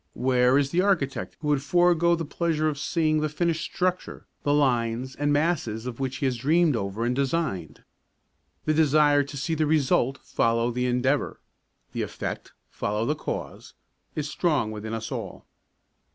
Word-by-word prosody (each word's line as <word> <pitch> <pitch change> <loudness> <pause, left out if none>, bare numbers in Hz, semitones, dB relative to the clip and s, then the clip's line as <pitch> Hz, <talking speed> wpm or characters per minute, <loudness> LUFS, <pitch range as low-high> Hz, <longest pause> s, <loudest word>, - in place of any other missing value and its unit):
Where 125 0 +3
is 140 -1 +1
the 175 - +2
architect 180 -9 0
who 150 - -2
would 145 -2 +2
forego 170 +2 +3
the 165 -1 -4
pleasure 155 0 0
of 145 -2 -2
seeing 155 -1 +1
the 155 0 0
finished 165 +1 -1
structure, 185 0 -2 0.2
the 145 - 0
lines 125 -3 +1
and 145 0 0
masses 145 -8 0
of 125 -1 -6
which 130 -1 -2
he - - -2
has 130 -2 0
dreamed 155 +4 +3
over 100 +2 -2
and 125 +1 0
designed? 135 - -2 0.8
The 155 - +2
desire 150 -1 +4
to 140 +1 -6
see 160 +4 -2
the 155 -1 +1
result 140 -3 +2
follow 115 +1 +1
the 125 +1 -1
endeavour, 130 +3 0 0.5
the - - -3
effect - - -5 0.2
follow 105 +2 -2
the 150 - +1
cause, 155 - -6 0.4
is 150 -1 -2
strong 150 -8 0
within 110 +1 -5
us 110 -1 -5
all. - - -6
145 Hz, 165 wpm, -26 LUFS, 125-155 Hz, 0.8 s, desire